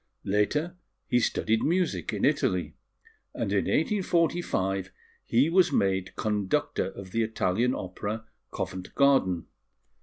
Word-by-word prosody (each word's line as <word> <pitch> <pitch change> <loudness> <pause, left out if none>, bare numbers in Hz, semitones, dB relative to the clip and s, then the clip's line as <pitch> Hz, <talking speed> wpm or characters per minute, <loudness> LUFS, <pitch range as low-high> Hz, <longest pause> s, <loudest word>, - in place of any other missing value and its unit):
Later 150 - 0 0.3
he 125 - +2
studied 110 -1 +1
music 180 +3 0
in - - 0
Italy; - - +1 0.6
and - - -2
in - - +1
1845 170 - 0 0.3
he 125 +6 +3
was 175 +1 +4
made 95 -1 0
conductor 105 -3 0
of 95 -2 -9
the 115 - 0
Italian 110 +2 +1
Opera, 105 +4 -5 0.2
Covent 95 0 -5
Garden. 135 - +3
110 Hz, 115 wpm, -28 LUFS, 95-155 Hz, 0.6 s, was